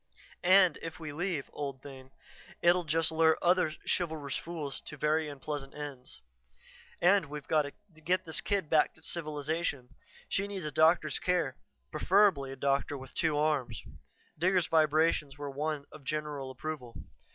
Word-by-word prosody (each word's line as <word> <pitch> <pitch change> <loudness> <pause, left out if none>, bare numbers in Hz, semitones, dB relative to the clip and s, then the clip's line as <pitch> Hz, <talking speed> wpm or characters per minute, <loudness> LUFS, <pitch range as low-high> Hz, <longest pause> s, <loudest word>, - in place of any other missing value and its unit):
And 185 -2 +5
if 165 -1 -7
we 155 -3 -6
leave, 170 -3 -2
old 140 -2 -5
thing, 130 -2 -11 0.5
it'll 175 0 +4
just 160 +1 +1
lure 160 0 +4
other 180 -2 +3
chivalrous 155 -5 -1
fools 160 -5 -4
to 150 - -7
very 150 +1 +1
unpleasant 145 -1 -6
ends. 135 - -7 0.8
"And 190 -2 +4
we've 150 -1 -7
got 150 -2 +2 0.2
to 155 - -19
get 185 +3 +1
this 160 - -1
kid 200 -5 0
back 155 0 +3
to 160 - -18
civilization. 150 -4 -2 0.4
She 200 +1 0
needs 195 -4 -5
a 150 - -3
doctor's 155 0 +3
care, 175 -8 0 0.4
preferably 185 -9 +3
a - - -6
doctor 140 +1 0
with 130 0 -11
two 160 -3 +1
arms." 145 -7 0 0.6
Digger's 180 0 +3
vibrations 155 -2 +2
were 145 -1 -5
one 150 +1 -2
of 155 - -12
general 150 -2 -3
approval. 130 -3 -6
155 Hz, 150 wpm, -31 LUFS, 140-165 Hz, 0.8 s, And